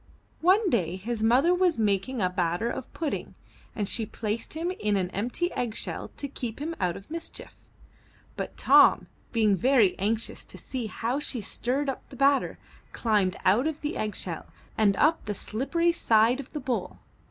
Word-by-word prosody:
One 380 +5 +4
day 180 -7 +1
his 220 +4 -4
mother 255 +10 +4
was 360 -2 +2
making 210 +2 0
a 180 - +3
batter 180 +4 0 0.2
pudding 320 -4 -4 0.4
and 205 -2 -1
she 220 +1 0
placed 220 +7 -3
him 335 +3 -1
in 210 - 0
an 185 -1 -1
empty 245 - -1
egg 235 -3 -2
shell - - -4
to 285 - -3
keep 245 -5 -5
him 320 +4 -4
out 180 -2 0
of 195 - -14
mischief. 335 0 -7 0.8
But - - -5
Tom, - - +6 0.3
being 215 -4 +3
very 230 -2 +4
anxious 220 +3 -1
to - - -10
see 250 -4 -4
how 235 +6 -2
she 280 -4 -3
stirred 250 +7 -2
up 270 - -4
the - - -11
batter, 275 +1 +2 0.4
climbed 205 -5 +1
out 215 +10 +4
of 315 -1 -4
the 295 - -3
egg 210 -2 -2
shell 170 -4 -6 0.3
and 200 -3 +3
up 320 +2 +3
the 210 -1 -3
slippery 335 - 0
side 230 -5 +3
of 275 - -8
the 300 - -4
bowl. 240 -9 -3
235 Hz, 175 wpm, -27 LUFS, 205-285 Hz, 0.8 s, Tom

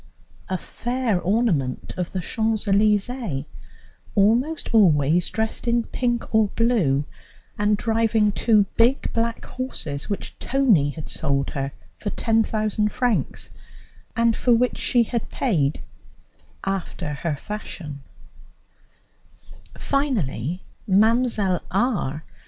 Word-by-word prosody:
a 185 - 0
fair 240 -1 -1
ornament 180 - 0
of 180 -1 -3
the 185 - -2
Champs 220 +3 -1
Elysées, 205 - +1 0.7
almost 235 +10 +2
always 170 -5 +4
dressed 220 +2 -2
in 235 0 +2
pink 240 0 -2
or 220 -1 +5
blue, 185 - +2 0.5
and 210 0 +3
driving 225 -1 +2
two 210 +1 +4
big 240 +4 +3
black 230 0 -1
horses 160 - -5
which 200 - -4
Tony 230 - +3
had 155 +1 -7
sold 140 -3 -1
her 135 0 -3 0.2
for 205 - -4
10,000 215 -1 +1
francs, 245 -3 -1 0.6
and 230 -1 +3
for 245 - +3
which 250 +2 +1
she 240 -1 +3
had 230 0 -3
paid, 155 - 0 0.8
after 180 -5 -3
her 150 +2 -2
fashion; 155 -5 -7 1.8
finally, 185 - -1 0.2
Mlle. 215 -2 +3
R. 190 - 0
210 Hz, 105 wpm, -23 LUFS, 170-235 Hz, 1.8 s, or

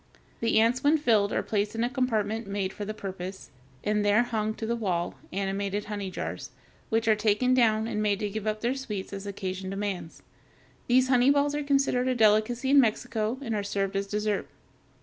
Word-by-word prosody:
The 230 -1 +3
ants 230 +3 +2
when 295 +2 +5
filled 220 -8 +2
are - - 0
placed 210 0 -1
in 225 - 0
a - - +2
compartment 225 -4 -1
made 195 -1 -2
for 205 - -5
the 215 - -4
purpose, 190 -1 -7 0.3
and 210 0 +1
there 205 +3 +4
hung 220 -2 -2
to 225 - -5
the 235 +1 0
wall, 180 -7 -1 0.2
animated 200 +1 -2
honey 205 -2 -4
jars, - - -5 0.4
which 225 0 +1
are 220 - +5
taken 215 +4 +2
down 220 -3 +3
and 210 -2 -2
made 205 -1 +2
to 210 - -1
give 215 +1 -4
up 215 0 -1
their 240 +2 +1
sweets 210 -8 -5
as 200 0 -6
occasion 190 -1 -4
demands. 195 -4 -4 0.6
These 255 +1 +4
honey 250 0 +5
balls 285 0 +3
are 295 - -1
considered 275 -3 +1
a 255 - +1
delicacy 225 +4 +3
in 285 - +7
Mexico, 225 0 -1
and 230 -4 -3
are 210 - 0
served 200 -1 -2
as 195 0 -1
dessert. 210 0 -1
215 Hz, 200 wpm, -27 LUFS, 200-240 Hz, 0.6 s, in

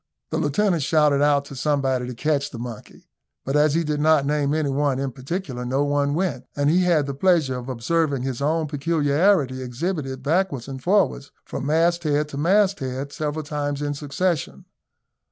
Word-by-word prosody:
The 160 - 0
lieutenant 170 +3 +1
shouted 150 -1 +3
out 145 -1 +3
to 140 - -10
somebody 135 -3 0
to 125 - -6
catch 145 +2 0
the 120 - -9
monkey, 120 -2 -9 0.4
but 135 - -1
as 150 0 +3
he 170 - +2
did 150 -1 -2
not 155 -2 +4
name 145 -1 0
any 150 -2 0
one 140 -1 +1
in 135 0 -2
particular, 135 0 -5
no 130 +3 0
one 145 0 +1
went, 165 -8 -2
and 145 +1 +2
he 180 +3 +3
had 165 -5 +3
the 140 - -4
pleasure 155 -4 +2
of 125 +1 -8
observing 140 +2 0
his 130 -1 -3
own 160 +3 +1
peculiarity 145 -1 +1
exhibited 135 0 -4
backwards 155 -4 0
and 135 -1 -7
forwards, 185 -6 +1
from 140 - -5
mast 170 +3 +2
head 150 -1 0
to 140 - -7
mast 195 +4 +3
head, 135 +2 -4
several 155 -1 -3
times 145 -1 -3
in 145 0 -2
succession. 150 +3 -2
145 Hz, 185 wpm, -23 LUFS, 135-160 Hz, 0.4 s, not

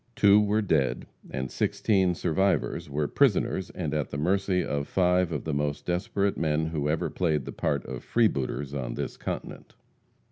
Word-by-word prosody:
Two 105 0 +6
were 105 +1 +1
dead, 75 -9 +1 0.2
and 65 0 -4
sixteen 95 -4 +1
survivors 95 -1 0
were 75 +1 -1
prisoners, 105 - +1
and 80 -5 -4
at 75 -2 -1
the - - -5
mercy 95 +3 +1
of 70 0 -2
five 90 -1 +2
of 75 - -3
the 80 - -3
most 75 0 -2
desperate 95 +3 0
men 80 -1 +1
who 75 -2 -2
ever 80 +1 -1
played 80 -6 0
the - - -5
part 70 -2 -1
of - - -6
freebooters 75 - 0
on 65 -4 -3
this - - -4
continent. - - -6
80 Hz, 170 wpm, -27 LUFS, 75-95 Hz, 0.2 s, Two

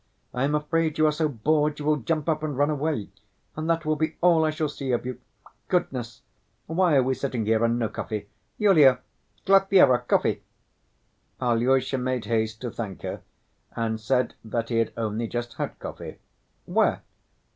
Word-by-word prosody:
I 125 +2 0
am 145 +2 +1
afraid 155 +1 0
you 155 - +4
are 155 - +4
so 155 +1 0
bored 150 +4 +1
you 145 - -6
will 150 0 +3
jump 155 +3 -2
up 155 -2 +1
and 150 -4 -3
run 145 +2 +2
away, 145 -6 -2 0.5
and 155 +1 -3
that 165 -1 +1
will 155 0 +1
be 155 +1 -1
all 170 -2 +4
I 155 - +2
shall 155 0 -1
see 140 -2 -4
of 120 - -1
you. 125 -1 -5 0.5
Goodness! 125 -10 -2 0.4
Why 170 -1 +2
are 135 - +5
we 130 +1 +1
sitting 130 -4 -3
here 110 +1 +2
and 115 0 +2
no 115 -2 0
coffee? 105 -1 -5 0.3
Yulia, 150 - +5 0.4
Glafira, 195 -9 +5
coffee!" - - +1 1.0
Alyosha 130 +2 +1
made 125 -1 -2
haste 110 -1 -1
to 120 -2 -4
thank 100 -5 -6
her, - - -5 0.5
and 110 -1 -1
said 125 +3 0
that 115 +1 -3
he 115 - 0
had 115 - 0
only 115 0 -2
just 120 +1 -4
had - - -4
coffee. - - -8 0.5
"Where?" - - +1
135 Hz, 180 wpm, -25 LUFS, 115-155 Hz, 1.0 s, are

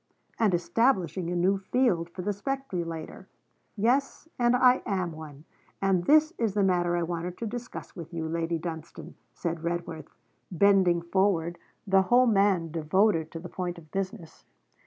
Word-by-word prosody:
'And 220 -4 +3
establishing 180 -1 +1
a 175 - -2
new 190 +3 +2
field 195 -5 +1
for 180 +1 -7
the 205 +2 -1
speculator.' 190 -9 -5 0.5
'Yes, 255 +9 0
and 240 0 +4
I 250 0 +5
am 185 -3 -2
one, 155 -2 -11 0.3
and 190 -3 +1
this 310 - +5
is 220 -4 0
the 205 - +2
matter 175 -2 +2
I 175 - 0
wanted 175 +1 -4
to 235 - -4
discuss 245 +3 -7
with 170 -2 -9
you, 165 -2 -4
Lady 165 +1 -1
Dunstane,' 165 0 -7 0.2
said 170 -2 -4
Redworth, 170 -2 -4 0.4
bending 185 -2 +3
forward, 175 -2 0 0.3
the 195 -1 +4
whole 245 +7 +4
man 195 -7 +2
devoted 165 +1 +1
to 165 - -7
the 175 - -8
point 175 0 -4
of 155 -3 -15
business. 185 -4 -5
180 Hz, 155 wpm, -27 LUFS, 170-205 Hz, 0.5 s, I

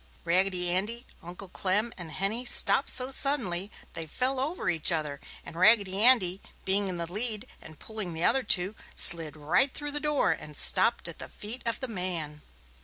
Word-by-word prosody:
Raggedy 180 0 +1
Andy, 220 +7 -3 0.2
Uncle 180 +3 -9
Clem 205 +6 -2
and 170 -3 -8
Henny 200 +8 0
stopped 260 +2 +3
so 255 +1 +3
suddenly 210 -10 +1 0.2
they 165 -1 -6
fell 255 - -1
over 310 +7 -3
each 165 -1 +3
other 150 -4 -3 0.2
and - - -11
Raggedy 200 +1 +3
Andy, 200 -7 +3 0.2
being 195 +1 +1
in 185 -2 -4
the 170 - -4
lead 215 +5 -3 0.2
and 155 -1 -14
pulling 215 -3 -7
the 160 +1 -4
other 270 - +3
two, 190 -4 +2 0.2
slid 160 -3 +4
right 170 - +1
through 290 +1 -6
the 295 - 0
door 300 - 0
and 150 -2 -6
stopped - - +4
at - - -8
the - - -9
feet 225 +5 -8
of 230 - -2
the 260 - -2
man. 175 -8 -2
190 Hz, 180 wpm, -27 LUFS, 170-235 Hz, 0.2 s, slid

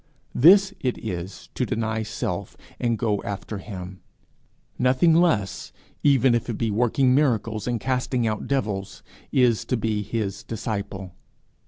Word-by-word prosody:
This 195 +7 +6
it 125 -2 -1
is 90 +2 -6
to - - -1
deny 110 -2 -1
self 110 0 -4 0.2
and 115 -2 0
go 105 -4 0
after 100 +1 -5
him; 95 -3 -8 0.8
nothing 130 +6 +4
less, 160 - +1 0.3
even 135 -3 +4
if 120 +1 -1
it 115 - -2
be 115 -2 0
working 125 +4 +2
miracles 115 -6 +1
and 120 -2 0
casting 125 -1 -1
out 110 -1 -2
devils, 105 -8 -2 0.3
is 125 -4 +3
to 125 - 0
be 110 -1 -1
his 105 -2 -3
disciple. 100 -4 -5
115 Hz, 140 wpm, -24 LUFS, 105-130 Hz, 0.8 s, This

